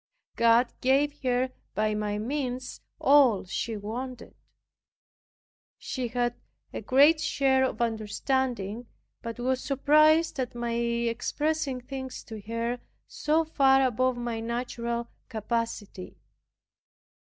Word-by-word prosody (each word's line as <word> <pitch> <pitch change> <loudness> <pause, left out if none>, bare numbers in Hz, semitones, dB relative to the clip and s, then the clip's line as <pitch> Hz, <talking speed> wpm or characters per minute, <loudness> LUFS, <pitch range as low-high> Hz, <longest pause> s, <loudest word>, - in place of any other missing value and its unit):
God 235 +1 +4
gave 285 +3 +2
her 255 0 +1 0.2
by 215 +1 +1
my 210 -1 -2
means 255 +2 -3 0.2
all 265 -9 +5
she 220 +4 -3
wanted. 240 +4 -6 1.4
She 255 -2 -4
had 240 0 0 0.4
a - - -4
great 290 +4 +5
share 265 -3 +2
of 240 -2 -1
understanding, 230 0 -2 0.3
but 230 0 -6
was 255 +1 0
surprised 305 +3 +4
at 250 -2 -3
my 235 -1 -2
expressing 235 +5 -1
things 260 0 -7
to 220 -2 -9
her 230 +2 -2 0.3
so 315 +2 +1
far 270 -3 +4
above 255 +1 +1
my 240 -2 -3
natural 235 0 -3 0.2
capacity. 225 -4 -4
245 Hz, 110 wpm, -28 LUFS, 230-265 Hz, 1.4 s, all